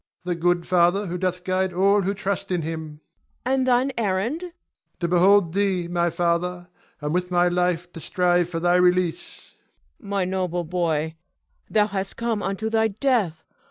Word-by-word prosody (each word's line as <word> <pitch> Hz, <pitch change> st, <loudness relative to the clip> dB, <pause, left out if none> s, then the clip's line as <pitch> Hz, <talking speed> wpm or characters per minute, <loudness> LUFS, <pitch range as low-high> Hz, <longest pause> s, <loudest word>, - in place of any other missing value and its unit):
Ion. 180 Hz, -, 0 dB
The 170 Hz, -, -12 dB
good 175 Hz, 0 st, +2 dB
Father 180 Hz, +3 st, +3 dB
who 180 Hz, -1 st, -4 dB
doth 180 Hz, -1 st, -2 dB
guide 185 Hz, 0 st, 0 dB
all 200 Hz, +3 st, +3 dB
who 195 Hz, +2 st, -1 dB
trust 200 Hz, 0 st, -3 dB
in 180 Hz, -3 st, -1 dB
him. 155 Hz, -1 st, -6 dB, 0.4 s
Cleon. 260 Hz, -, +1 dB
And 260 Hz, -, 0 dB
thine 255 Hz, +2 st, +3 dB
errand? 220 Hz, -, -1 dB
Ion. 355 Hz, -, -7 dB, 0.5 s
To 170 Hz, -, 0 dB
behold 180 Hz, 0 st, +4 dB
thee, 190 Hz, -3 st, 0 dB
my 175 Hz, 0 st, +1 dB
father, 175 Hz, +1 st, -1 dB, 0.3 s
and 150 Hz, +1 st, -2 dB
with 180 Hz, 0 st, -1 dB
my 175 Hz, 0 st, +3 dB
life 180 Hz, 0 st, 0 dB
to 165 Hz, -, -8 dB
strive 175 Hz, +1 st, +1 dB
for 165 Hz, -2 st, -3 dB
thy 175 Hz, +1 st, +3 dB
release. 180 Hz, -1 st, 0 dB, 0.5 s
Cleon. -, -, -12 dB
My 200 Hz, -2 st, 0 dB
noble 180 Hz, -2 st, -2 dB
boy, 160 Hz, -2 st, -1 dB, 0.5 s
thou 210 Hz, -1 st, +3 dB
hast 195 Hz, -2 st, -4 dB
come 230 Hz, -3 st, -1 dB
unto 195 Hz, +3 st, -2 dB
thy 220 Hz, 0 st, +2 dB
death. 210 Hz, -, 0 dB
180 Hz, 180 wpm, -24 LUFS, 175-200 Hz, 0.5 s, behold